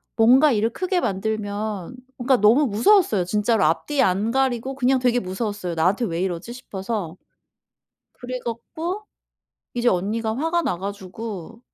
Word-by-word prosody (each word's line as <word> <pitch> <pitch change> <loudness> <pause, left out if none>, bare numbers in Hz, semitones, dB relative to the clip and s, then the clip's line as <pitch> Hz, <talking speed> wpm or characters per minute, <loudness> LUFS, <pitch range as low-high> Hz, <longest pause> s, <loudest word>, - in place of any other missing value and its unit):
뭔가 255 +6 +6
일을 225 0 +1
크게 370 +4 -1
만들면 210 -1 -3 0.2
뭔가 255 +1 +3
너무 235 +8 +5
무서웠어요. 230 - +3
진짜로 210 +3 +1
앞뒤 280 - +1
안 195 +4 +2
가리고 265 0 0
그냥 260 0 +2
되게 245 -1 +2
무서웠어요. 190 -2 -4
나한테 185 +9 +2
왜 170 -3 -2
이러지 190 +5 -3
싶어서. 195 -6 -5 1.0
그래 250 +1 -6
갖고 320 - -4 0.7
이제 245 0 +2
언니가 220 +4 0
화가 325 +5 0
나 180 - -1
가지고 200 +2 -7
225 Hz, 310 characters per minute, -23 LUFS, 195-255 Hz, 1.0 s, 뭔가